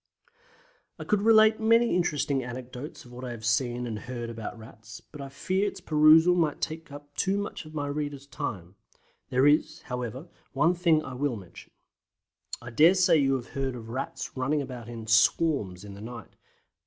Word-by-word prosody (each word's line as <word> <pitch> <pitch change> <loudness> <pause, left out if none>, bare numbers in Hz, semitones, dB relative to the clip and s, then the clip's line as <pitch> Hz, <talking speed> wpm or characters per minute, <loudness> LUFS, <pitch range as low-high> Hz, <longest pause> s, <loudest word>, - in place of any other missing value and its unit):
I - - -6
could 210 -1 +1
relate 220 0 +6
many 230 +1 +4
interesting 145 -6 0
anecdotes 125 +3 -8
of 120 - -14
what 125 +1 -9
I 125 - -4
have 115 -2 -7
seen 120 +1 0
and 110 -3 -4
heard 120 -1 -6
about 115 0 -7
Rats, 110 -1 -12
but 145 - -12
I 135 - -7
fear 185 +8 -1
its 195 -1 -5
perusal 160 +1 +6
might 165 -4 +1
take 160 -1 -5
up 145 0 -11
too 195 +1 +1
much 205 -4 -5
of 155 0 -12
my 145 -1 -2
readers' 145 -1 -4
time. 100 -10 -6 0.6
There 130 +2 +3
is, 145 +1 +2
however, 125 - -5 0.3
one 150 +6 +3
thing 170 -3 +2
I 130 - -7
will 135 0 -1
mention. 95 -5 -12 0.9
I 120 - -8
dare 160 +10 +6
say 180 -3 +4
you 135 -2 +2
have 125 -2 -5
heard 135 -2 -3
of 115 -2 -9
Rats 130 +3 -5
running 140 +3 0
about 125 -3 -8
in 115 -2 -7
"swarms" 110 - +2
in 100 - -9
the 100 - -11
night. 115 -1 -9
135 Hz, 185 wpm, -27 LUFS, 120-160 Hz, 0.9 s, relate